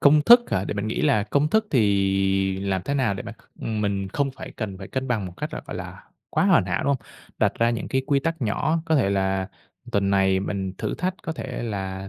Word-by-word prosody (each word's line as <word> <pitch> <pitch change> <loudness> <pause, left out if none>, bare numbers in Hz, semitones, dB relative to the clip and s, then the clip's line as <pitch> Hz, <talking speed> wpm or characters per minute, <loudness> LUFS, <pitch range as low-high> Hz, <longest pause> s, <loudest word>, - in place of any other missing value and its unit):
công 150 +1 +6
thức 240 +8 +9
hả 95 - +1
để - - -3
mình 100 +1 -2
nghĩ 110 - -2
là 135 -9 +3
công 140 +8 +1
thức 220 0 +3
thì 95 -4 +2
làm 95 -2 -1
thế 140 - -1
nào 130 -7 +1
để 95 - -5
mà, 115 - -7 0.3
ừm, 110 -1 -2
mình 100 -2 -1
không 140 +5 -1
phải - - -9
cần 100 -5 -4
phải 95 - -8
cân 130 0 -3
bằng 110 -6 0
một 90 - -8
cách - - -4
là - - -4
phải - - -6
là - - -8 0.3
quá - - +2
hoàn - - +5
hảo, 90 0 -1
đúng - - +1
hông? 140 - +3 0.4
Đặt - - +3
ra 115 0 +3
những 115 - -3
cái 130 0 0
quy 140 -2 +2
tắc 165 -1 -2
nhỏ, 150 +9 0
có 160 - +2
thể 115 -8 +2
là 95 -1 0 0.4
tuần 100 -1 +2
này 95 -1 +3
mình 95 -1 -3
thử - - -2
thách 185 +1 -2
có 160 - -3
thể 130 -6 -5
là, 95 -3 -4
105 Hz, 255 wpm, -24 LUFS, 95-140 Hz, 0.4 s, thức